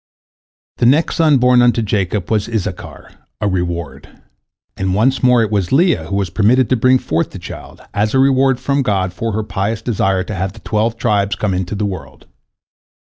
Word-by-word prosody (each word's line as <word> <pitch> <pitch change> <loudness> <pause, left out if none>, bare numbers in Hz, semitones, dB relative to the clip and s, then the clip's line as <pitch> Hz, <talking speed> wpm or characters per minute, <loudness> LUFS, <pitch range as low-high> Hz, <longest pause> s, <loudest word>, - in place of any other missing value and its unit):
" - - -73
The 120 - +4
next 150 +6 +2
son 155 -4 +4
born 125 0 +4
unto 120 -1 +3
Jacob 100 -2 -2
was 110 0 0
Issachar, 110 -5 -5 0.3
"a 105 - -1
reward," 85 -7 -3 0.7
and 95 -1 -1
once 130 +5 +2
more 125 -2 +4
it 110 - -3
was 100 -4 -1
Leah 140 - +2
who 100 - -4
was 100 -4 -1
permitted 115 +6 +2
to 130 - +3
bring 130 +2 +4
forth 80 -9 -2
the - - -10
child, - - -10
as 105 +4 0
a - - +4
reward 135 -1 +3
from 140 +2 0
God 95 -6 -1
for 110 +5 -3
her 110 +1 -1
pious 105 +2 -3
desire 95 -5 0
to 105 - -6
have 95 0 -3
the - - -13
twelve 110 +2 -1
tribes 100 -2 0
come 105 -3 -1
into 90 +2 -3
the 105 +1 -1
world. 95 -4 -7
105 Hz, 200 wpm, -17 LUFS, 95-125 Hz, 0.7 s, The